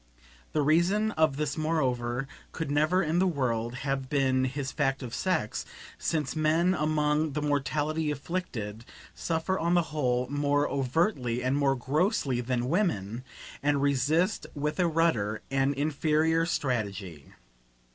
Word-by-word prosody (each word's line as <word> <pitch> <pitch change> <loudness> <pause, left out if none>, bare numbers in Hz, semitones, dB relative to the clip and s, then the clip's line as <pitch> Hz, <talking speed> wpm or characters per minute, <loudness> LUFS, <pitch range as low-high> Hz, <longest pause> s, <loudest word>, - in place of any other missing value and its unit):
The 150 - +2
reason 180 +8 +3
of 155 -6 +2
this 150 0 -2
moreover 130 -5 0 0.3
could 160 -3 -3
never 155 +6 +3
in 165 +2 +1
the 190 - +3
world 120 -7 -1
have 135 -1 -2
been 130 -3 +2
his 135 +1 -3
fact 135 -2 0
of 120 -2 -6
sex; 170 - -1 0.4
since 150 -4 -1
men, 160 +4 +3
among 150 -1 +1
the 150 - -1
mortally 150 +2 0
afflicted, 135 - -4 0.3
suffer 165 +3 -1
on 170 +2 +2
the 175 - +4
whole 125 -4 +1
more 145 0 +1
overtly 130 - 0
and 130 +2 +1
more 140 -1 +2
grossly 140 - 0
than 125 0 -1
women, 125 - 0 0.4
and 145 -1 +1
resist 145 - +1
with 150 +4 -2
a 180 - +4
ruder, 150 -11 +1
an 135 +1 +2
inferior 155 +3 +1
strategy. 100 - -3
145 Hz, 135 wpm, -28 LUFS, 130-160 Hz, 0.4 s, the